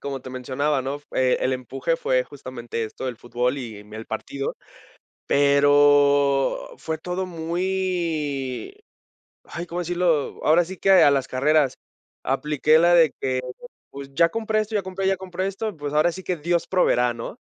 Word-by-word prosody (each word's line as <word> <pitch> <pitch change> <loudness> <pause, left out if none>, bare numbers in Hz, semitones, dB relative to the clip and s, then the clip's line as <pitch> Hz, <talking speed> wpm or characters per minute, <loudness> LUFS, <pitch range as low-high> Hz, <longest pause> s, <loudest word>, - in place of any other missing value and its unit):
como 140 -1 -5
te 130 - -8
mencionaba, 135 +3 -1
¿no? 135 +2 -4
Eh, 130 -1 +3
el 130 - +1
empuje 130 +5 -2
fue 130 -4 +1
justamente 120 -5 -6
esto 110 - -8
del 125 -2 -3
fútbol 125 +3 -1
y 110 -5 -8
mi 105 +1 -11
el 110 - -8
partido. 135 +5 -4 0.7
Pero 145 -1 +4
fue 160 0 -4
todo 180 +3 -4
muy 170 - -2 0.7
Ay, 170 - -6
¿cómo 170 +1 -4
decirlo? 175 -4 0
Ahora 165 +3 +4
sí 190 +3 -8
que 195 - +2
a 180 -6 +7
las 135 -2 0
carreras. 140 +1 +2 0.5
Apliqué 150 +3 +2
la 175 +1 +5
de 165 -4 +5
que, 130 -1 0 0.5
pues, 140 0 -9
ya 170 +2 +4
compré 220 0 -1
esto, 215 +1 -3
ya 205 - +2
compré, 190 +1 -3
ya 195 - +3
compré 185 0 -4
esto, 195 -1 -4
pues, 145 -1 -5
ahora 155 +3 +3
sí 190 +2 -9
que 180 - -1
Dios 170 +2 0
proveerá, 125 -10 +2
¿no? 115 0 -7
145 Hz, 170 wpm, -23 LUFS, 130-175 Hz, 0.7 s, a